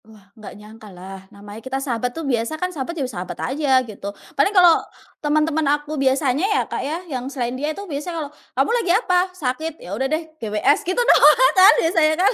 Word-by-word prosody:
Wah, 205 Hz, -3 st, -20 dB
enggak 215 Hz, -3 st, -11 dB
nyangkalah, 195 Hz, -3 st, -12 dB
namanya 205 Hz, +2 st, -12 dB
kita 260 Hz, +2 st, -4 dB
sahabat 250 Hz, -3 st, -2 dB
tuh 325 Hz, -, -4 dB
biasa 245 Hz, +3 st, -1 dB
kan 365 Hz, +2 st, -3 dB
sahabat 325 Hz, +3 st, -5 dB
jadi 275 Hz, -, -1 dB
sahabat 180 Hz, -1 st, -6 dB, 0.2 s
aja 270 Hz, -3 st, +2 dB
gitu. 205 Hz, -3 st, -8 dB, 0.2 s
Paling -, -, +2 dB
kalau 360 Hz, -5 st, +5 dB, 0.4 s
teman-teman 310 Hz, +1 st, +1 dB, 0.2 s
aku 295 Hz, +1 st, -9 dB
biasanya 270 Hz, -1 st, +1 dB
ya, 415 Hz, +2 st, +1 dB
Kak, -, -, -5 dB
ya, 305 Hz, +4 st, -3 dB
yang 260 Hz, -5 st, -5 dB
selain 245 Hz, -3 st, -3 dB
dia 285 Hz, +4 st, -3 dB
itu 400 Hz, +6 st, -6 dB
biasanya 330 Hz, +1 st, -5 dB
kalau, 285 Hz, -, -11 dB, 0.3 s
"Kamu 270 Hz, -, +2 dB
lagi 375 Hz, -, 0 dB
apa? 365 Hz, -4 st, +1 dB
Sakit? 315 Hz, +2 st, -3 dB
Ya 180 Hz, -, -9 dB
udah 265 Hz, +6 st, -2 dB
deh, 315 Hz, 0 st, -3 dB
GWS," 215 Hz, +5 st, +1 dB
gitu 370 Hz, -, -1 dB
doang -, -, +5 dB
kan 375 Hz, +2 st, +7 dB
biasanya, 325 Hz, -2 st, +3 dB
kan 380 Hz, +6 st, +3 dB
280 Hz, 200 wpm, -21 LUFS, 230-325 Hz, 0.4 s, kan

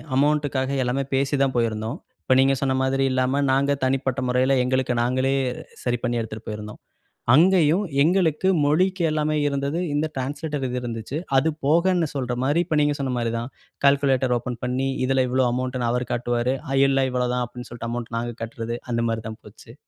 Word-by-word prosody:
அமௌண்ட்டுக்காக 145 Hz, -2 st, +1 dB
எல்லாமே 130 Hz, +3 st, 0 dB
பேசி 135 Hz, +2 st, +1 dB
தான் 130 Hz, -2 st, 0 dB
போயிருந்தோம். 110 Hz, 0 st, -1 dB, 0.3 s
இப்போ, 130 Hz, -, +2 dB
நீங்க 135 Hz, +1 st, +4 dB
சொன்ன 135 Hz, -1 st, +1 dB
மாதிரி 135 Hz, +1 st, +1 dB
இல்லாம 130 Hz, +2 st, +1 dB
நாங்க 140 Hz, +1 st, +2 dB
தனிப்பட்ட 130 Hz, 0 st, 0 dB
முறையில 130 Hz, +2 st, +2 dB
எங்களுக்கு 130 Hz, 0 st, 0 dB
நாங்களே 130 Hz, +2 st, +1 dB, 0.5 s
சரி 120 Hz, -1 st, 0 dB
பண்ணி 120 Hz, -1 st, 0 dB
எடுத்துட்டு 110 Hz, 0 st, -8 dB
போயிருந்தோம். 105 Hz, 0 st, -7 dB, 0.5 s
அங்கேயும் 175 Hz, +3 st, +5 dB, 0.2 s
எங்களுக்கு 175 Hz, 0 st, +2 dB, 0.2 s
மொழிக்கு 180 Hz, +5 st, +2 dB
எல்லாமே 155 Hz, 0 st, 0 dB
இருந்தது. 140 Hz, +3 st, -1 dB
இந்த 150 Hz, +2 st, +1 dB
ட்ரான்ஸ்லேட்டர் 145 Hz, +1 st, -3 dB
இது 125 Hz, 0 st, -2 dB
இருந்துச்சு. 120 Hz, +3 st, -5 dB, 0.2 s
அது 160 Hz, +4 st, +3 dB, 0.2 s
போகன்னு 170 Hz, +2 st, +3 dB
சொல்ற 125 Hz, -2 st, -2 dB
மாரி, 145 Hz, +6 st, +2 dB
இப்ப 155 Hz, -3 st, 0 dB
நீங்க 145 Hz, 0 st, +2 dB
சொன்ன 130 Hz, -2 st, -1 dB
மாரி 115 Hz, -1 st, -1 dB
தான். 120 Hz, +3 st, -4 dB, 0.4 s
கால்குலேட்டர் 135 Hz, -2 st, +3 dB
ஓப்பன் 120 Hz, -1 st, -6 dB
பண்ணி, 130 Hz, +2 st, -1 dB, 0.2 s
இதில 130 Hz, 0 st, +2 dB
இவ்வளோ 130 Hz, 0 st, +2 dB
அமௌண்ட்டுன்னு 125 Hz, -1 st, -1 dB
அவரு 125 Hz, 0 st, -1 dB
காட்டுவாரு. 120 Hz, +1 st, 0 dB, 0.2 s
ஆ 135 Hz, -, +1 dB
இல்ல 135 Hz, -1 st, +2 dB
இவ்வளோதான். 125 Hz, 0 st, 0 dB
அப்படின்னு 125 Hz, +1 st, -10 dB
சொல்ட்டு 115 Hz, -1 st, -6 dB
அமௌண்ட்ட 120 Hz, -1 st, -4 dB
நாங்க 120 Hz, 0 st, -4 dB
கட்டுறது, 115 Hz, +1 st, -5 dB
அந்த 115 Hz, 0 st, 0 dB
மாரி 115 Hz, 0 st, -2 dB
தான் 110 Hz, -, -9 dB
போச்சு. -, -, -14 dB
130 Hz, 170 wpm, -23 LUFS, 120-145 Hz, 0.5 s, அங்கேயும்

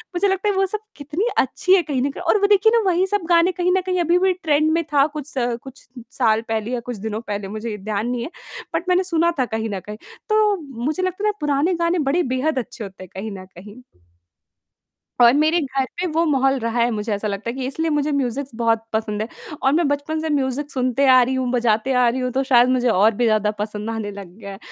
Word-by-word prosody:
मुझे 375 Hz, +3 st, +2 dB
लगता 385 Hz, +1 st, 0 dB
है -, -, +1 dB
वो 385 Hz, 0 st, +3 dB
सब 420 Hz, +3 st, -3 dB, 0.2 s
कितनी 295 Hz, +8 st, -3 dB
अच्छी 360 Hz, +8 st, +2 dB
है 380 Hz, -, +4 dB
कहीं 275 Hz, -4 st, -2 dB
न 275 Hz, -, +1 dB
कहीं 280 Hz, -, -9 dB
और 355 Hz, +4 st, +3 dB
वो 405 Hz, -, +4 dB
देखिए 415 Hz, +2 st, +4 dB
ना -, -, +5 dB
वही 360 Hz, +1 st, +2 dB
सब 410 Hz, +1 st, 0 dB
गाने 340 Hz, +1 st, +4 dB
कहीं 360 Hz, 0 st, 0 dB
न -, -, +1 dB
कहीं 365 Hz, -1 st, 0 dB
अभी 345 Hz, +1 st, +3 dB
भी 380 Hz, 0 st, +3 dB
ट्रेंड 310 Hz, -4 st, +1 dB
में 335 Hz, +1 st, +1 dB
था 280 Hz, -1 st, +5 dB
कुछ 295 Hz, -2 st, -6 dB
स 245 Hz, -5 st, -2 dB
कुछ 265 Hz, +1 st, -13 dB, 0.2 s
साल 225 Hz, -4 st, +2 dB
पहले 220 Hz, +1 st, -2 dB
या 250 Hz, -, -1 dB
कुछ 245 Hz, -, -4 dB
दिनों 215 Hz, +2 st, -4 dB
पहले 205 Hz, -1 st, -3 dB
मुझे 215 Hz, +2 st, -5 dB
ध्यान 210 Hz, +2 st, -3 dB
नहीं 245 Hz, -1 st, -2 dB
है। -, -, -5 dB, 0.4 s
बट 330 Hz, +3 st, -2 dB
मैंने 365 Hz, +1 st, +3 dB
सुना 340 Hz, -2 st, +1 dB
था 255 Hz, -, +3 dB
कहीं 225 Hz, -1 st, -3 dB
न 200 Hz, -2 st, -3 dB
कहीं, 210 Hz, +3 st, -9 dB, 0.3 s
तो 430 Hz, -1 st, +3 dB, 0.3 s
मुझे 310 Hz, +5 st, -1 dB
लगता 370 Hz, +2 st, -2 dB
है -, -, +3 dB
ना -, -, -1 dB
पुराने 295 Hz, +4 st, +1 dB
गाने 335 Hz, +1 st, 0 dB
बड़े 345 Hz, +5 st, +2 dB
बेहद 260 Hz, +3 st, 0 dB
अच्छे 235 Hz, -2 st, -7 dB
होते 190 Hz, -2 st, -9 dB
हैं 185 Hz, -, -13 dB
कहीं 210 Hz, +3 st, -5 dB
न 185 Hz, -, -10 dB
कहीं। 205 Hz, +6 st, -13 dB, 1.4 s
और 235 Hz, 0 st, +8 dB
मेरे 315 Hz, +4 st, +3 dB
घर 270 Hz, -2 st, -1 dB, 0.2 s
पे 365 Hz, -, 0 dB
वो 335 Hz, -, +3 dB
माहौल 270 Hz, -2 st, +2 dB
रहा 230 Hz, +1 st, -2 dB
है 235 Hz, +1 st, +3 dB
मुझे 215 Hz, -1 st, -3 dB
ऐसा 205 Hz, +1 st, -3 dB
लगता 200 Hz, +3 st, -3 dB
है -, -, -6 dB
कि 260 Hz, -1 st, -3 dB
इसलिए 320 Hz, +5 st, -1 dB
मुझे 295 Hz, 0 st, 0 dB
म्यूज़िक्स 275 Hz, 0 st, -2 dB
बहुत 225 Hz, -1 st, +1 dB
पसंद 215 Hz, -1 st, -1 dB
है 220 Hz, -, -5 dB, 0.3 s
और 270 Hz, -, +3 dB
मैं 330 Hz, +2 st, +2 dB
बचपन 285 Hz, +2 st, -2 dB
से 320 Hz, -, -3 dB
म्यूज़िक 280 Hz, 0 st, -1 dB
सुनते 255 Hz, +1 st, +1 dB
आ 255 Hz, -1 st, +7 dB
रही 255 Hz, +2 st, 0 dB
हूँ, 260 Hz, -1 st, -1 dB
बजाते 240 Hz, +1 st, +1 dB
आ 250 Hz, -1 st, +4 dB
रही 250 Hz, +2 st, -1 dB
हूँ, 255 Hz, 0 st, -1 dB
तो 265 Hz, -, +1 dB
शायद 250 Hz, -2 st, +4 dB
मुझे 255 Hz, -1 st, +2 dB
और 215 Hz, 0 st, +4 dB
भी 240 Hz, -, 0 dB
ज़्यादा 215 Hz, -2 st, +2 dB
पसंद 210 Hz, +1 st, -4 dB
आने 220 Hz, -2 st, -4 dB
लग 195 Hz, -3 st, -10 dB
गया 200 Hz, -2 st, -8 dB
है। 195 Hz, -, -10 dB
265 Hz, 250 wpm, -21 LUFS, 225-330 Hz, 1.4 s, और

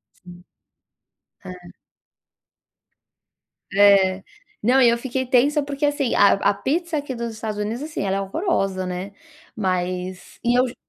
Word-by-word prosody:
Sim. 175 Hz, -1 st, -15 dB, 1.0 s
É. 185 Hz, 0 st, -7 dB, 2.2 s
É. 195 Hz, -2 st, +4 dB, 0.4 s
Não, 255 Hz, +5 st, +3 dB
e 240 Hz, -, +6 dB
eu 235 Hz, -, +2 dB
fiquei 260 Hz, +1 st, -3 dB
tensa, 280 Hz, +4 st, +2 dB
porque 285 Hz, +1 st, -2 dB
assim, 290 Hz, -4 st, 0 dB
a 200 Hz, -, +6 dB
a 200 Hz, +1 st, +2 dB
pizza 315 Hz, -, -2 dB
aqui 280 Hz, -3 st, -4 dB
dos 235 Hz, -1 st, -4 dB
Estados 215 Hz, -1 st, -5 dB
Unidos, 220 Hz, +5 st, -3 dB
assim, 305 Hz, -6 st, -5 dB
ela 195 Hz, 0 st, 0 dB
é -, -, -1 dB
horrorosa, 195 Hz, -, -1 dB
né, 180 Hz, +2 st, -5 dB, 0.4 s
mas 185 Hz, -1 st, -3 dB
e 240 Hz, +1 st, +2 dB
eu 255 Hz, +1 st, +3 dB
ju 245 Hz, -, -9 dB
220 Hz, 145 wpm, -22 LUFS, 190-265 Hz, 2.2 s, e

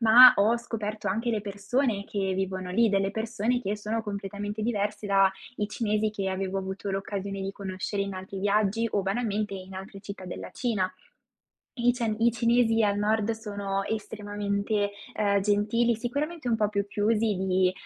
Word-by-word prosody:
Ma, 245 Hz, +3 st, +10 dB
ho 220 Hz, +4 st, +4 dB
scoperto 215 Hz, -2 st, -4 dB
anche 225 Hz, +5 st, 0 dB
le 215 Hz, -2 st, 0 dB
persone 205 Hz, +2 st, -1 dB
che 195 Hz, -2 st, -1 dB
vivono 185 Hz, -1 st, -2 dB
lì. 225 Hz, +3 st, +3 dB
Delle 195 Hz, 0 st, +2 dB
persone 230 Hz, +2 st, -1 dB
che 205 Hz, +2 st, -1 dB
sono 220 Hz, +2 st, -2 dB
completamente 205 Hz, 0 st, -4 dB
diverse 210 Hz, -2 st, -1 dB
dai 195 Hz, -1 st, +5 dB, 0.4 s
cinesi 215 Hz, -1 st, 0 dB
che 195 Hz, -2 st, -2 dB
avevo 190 Hz, 0 st, -2 dB
avuto 190 Hz, +1 st, -4 dB
l'occasione 195 Hz, 0 st, -3 dB
di 195 Hz, -, -2 dB
conoscere 195 Hz, +1 st, -3 dB
in 200 Hz, 0 st, -4 dB
altri 190 Hz, +1 st, -6 dB
viaggi, 210 Hz, +2 st, +2 dB
o 205 Hz, -, +2 dB
banalmente 205 Hz, 0 st, -1 dB
in 190 Hz, 0 st, -8 dB
altre 195 Hz, +1 st, -8 dB
città 200 Hz, -2 st, -8 dB
della 180 Hz, -, -6 dB
Cina. 200 Hz, -7 st, -1 dB, 0.8 s
I 245 Hz, -1 st, +2 dB
cian 230 Hz, -3 st, -1 dB
i 235 Hz, +1 st, +4 dB
cinesi 230 Hz, -1 st, +3 dB
al 205 Hz, 0 st, +2 dB
nord 215 Hz, +1 st, +1 dB
sono 200 Hz, -3 st, -3 dB
estremamente, 205 Hz, -1 st, -2 dB, 0.2 s
uhm, 200 Hz, -1 st, +2 dB
gentili. 210 Hz, +4 st, +2 dB
Sicuramente 285 Hz, +5 st, -3 dB
un 225 Hz, -, +2 dB
po' 210 Hz, -, +2 dB
più 200 Hz, -1 st, -1 dB
chiusi 210 Hz, +1 st, +1 dB
di, 185 Hz, -1 st, +2 dB
205 Hz, 165 wpm, -28 LUFS, 195-225 Hz, 0.8 s, Ma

